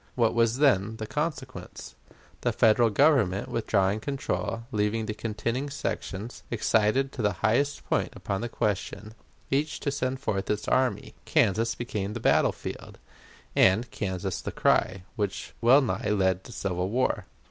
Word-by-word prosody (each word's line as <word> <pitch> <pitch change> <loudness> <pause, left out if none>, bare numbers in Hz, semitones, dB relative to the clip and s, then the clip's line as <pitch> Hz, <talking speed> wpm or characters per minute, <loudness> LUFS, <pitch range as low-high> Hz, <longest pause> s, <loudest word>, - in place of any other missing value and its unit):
What 115 -3 +2
was 115 0 +2
then 110 -7 +3
the 110 - -5
consequence? 130 - -5 0.5
The - - +1
Federal 115 +1 +4
Government 105 - +3
withdrawing 105 -2 +1
control, 115 -5 -3
leaving 105 0 0
the 110 - -3
contending 115 +5 -3
sections, 115 -4 -4
excited 115 +4 +2
to 125 - -5
the 105 -2 +2
highest 140 +6 +1
point - - +1
upon 100 +1 -3
this 120 - -3
question, 105 0 -2 0.4
each 145 +3 0
to 140 - -1
send 130 -1 -2
forth 100 -8 -2
its 105 0 -1
army, 130 -1 +1
Kansas 115 +4 +2
became 105 -4 -3
the 120 - -4
battle - - +3
field, - - -8 0.6
and 105 +6 +4
Kansas 95 -2 -3
the - - -4
cry, 95 -1 +1
which 100 -2 -3
wellnigh 120 -3 +4
led 95 -3 +1
to - - -10
civil 90 -4 -2
war. 130 +4 0
110 Hz, 145 wpm, -27 LUFS, 100-130 Hz, 0.6 s, Federal